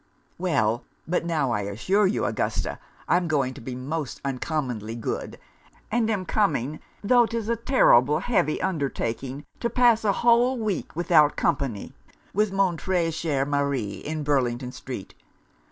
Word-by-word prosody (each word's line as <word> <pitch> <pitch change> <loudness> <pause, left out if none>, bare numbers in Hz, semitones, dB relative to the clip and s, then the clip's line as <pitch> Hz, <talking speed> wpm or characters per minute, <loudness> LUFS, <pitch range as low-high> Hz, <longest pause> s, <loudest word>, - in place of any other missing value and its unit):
'Well! 125 -11 +1 0.2
but 170 0 0
now 150 -7 0
I 105 -3 0
assure 150 - +1
you, 195 - 0
Augusta, - - -2 0.3
I'm 175 -1 +2
going 140 -5 +1
to 140 - -11
be 125 +2 -6
most 140 +1 -4
uncommonly 125 -5 -3
good; 115 - -4 0.5
and 225 0 +1
am 200 -4 -1
coming, 155 - 0 0.2
tho' 240 +2 +5
'tis 230 -2 -3
a 235 - +2
terrible 150 - +4
heavy 190 -10 +1
undertaking, 140 -5 -2
to 235 - -1
pass 235 -2 +4
a 210 - +3
whole 240 +2 +5
week, 215 -9 -3
without 160 -3 +4
company, 135 -10 -1 0.4
with 210 +1 +2
mon 195 -3 +1
tres 170 -2 0
cher 155 -4 0
Mari, 140 -7 0
in 155 +5 -4
Burlington 125 -3 0
street. 125 -5 -8
155 Hz, 145 wpm, -25 LUFS, 130-195 Hz, 0.5 s, tho